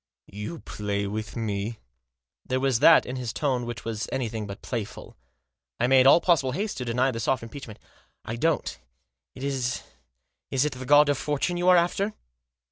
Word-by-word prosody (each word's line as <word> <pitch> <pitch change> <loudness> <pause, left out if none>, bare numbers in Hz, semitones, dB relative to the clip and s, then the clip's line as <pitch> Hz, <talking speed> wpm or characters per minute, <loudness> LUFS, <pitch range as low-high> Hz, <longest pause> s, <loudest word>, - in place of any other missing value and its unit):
" - - -67 0.2
You 165 +9 -6
play 100 -1 -3
with 105 +1 -5
me? 110 -1 -3 0.4
" 65 +2 -64
There 130 0 0
was 130 -3 +1
that 165 +4 +7
in 125 +1 -5
his 125 -3 -3
tone 125 -4 -1
which 115 -3 -6
was 115 -1 -3
anything 110 -4 -3
but 100 0 -9
playful. 115 -5 -5 0.6
I 120 - +3
made 130 +1 +6
all 140 - +8
possible 145 -8 +2
haste 200 +7 -3
to 125 - -4
deny 125 +3 +1
the 115 - -5
soft 120 +1 0
impeachment. 115 -2 -9 0.3
" - - -41
I 115 - -4
don't. 160 +6 0 0.6
Is 130 -2 -2 0.7
it 135 +2 +1
the 130 0 -8
God 145 +1 +7
of 145 - +1
Fortune 150 +4 -1
you 175 +1 +2
are 180 - +7
after?" 195 +5 +1
125 Hz, 185 wpm, -26 LUFS, 115-145 Hz, 0.7 s, all